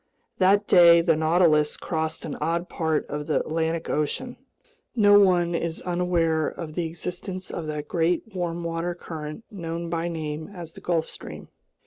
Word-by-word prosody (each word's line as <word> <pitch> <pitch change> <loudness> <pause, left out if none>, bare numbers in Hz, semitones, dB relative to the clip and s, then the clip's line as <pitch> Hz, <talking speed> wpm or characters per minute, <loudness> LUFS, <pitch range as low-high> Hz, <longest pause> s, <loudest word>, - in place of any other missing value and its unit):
That 200 +2 +4
day 170 -2 +7
the 165 -1 +3
Nautilus 155 -1 +3
crossed 160 -1 -3
an 155 - -4
odd 170 +2 -1
part 160 -2 0
of 150 0 -5
the 155 - +2
Atlantic 160 +1 -2
Ocean. 195 - -2 0.6
No 205 -3 +7
one 175 -3 +3
is 170 -1 -2
unaware 175 -3 +1
of 155 -2 -6
the 170 0 -1
existence 180 +3 -6
of 165 -2 -5
that 150 -1 -4
great 170 0 +1
warm 175 -2 -3
water 170 +1 -2
current 155 +2 -7
known 170 -3 -5
by 165 0 -1
name 155 -1 -4
as 170 -3 -8
the - - -13
Gulf 165 -2 0
Stream. - - -9
170 Hz, 160 wpm, -25 LUFS, 160-175 Hz, 0.6 s, day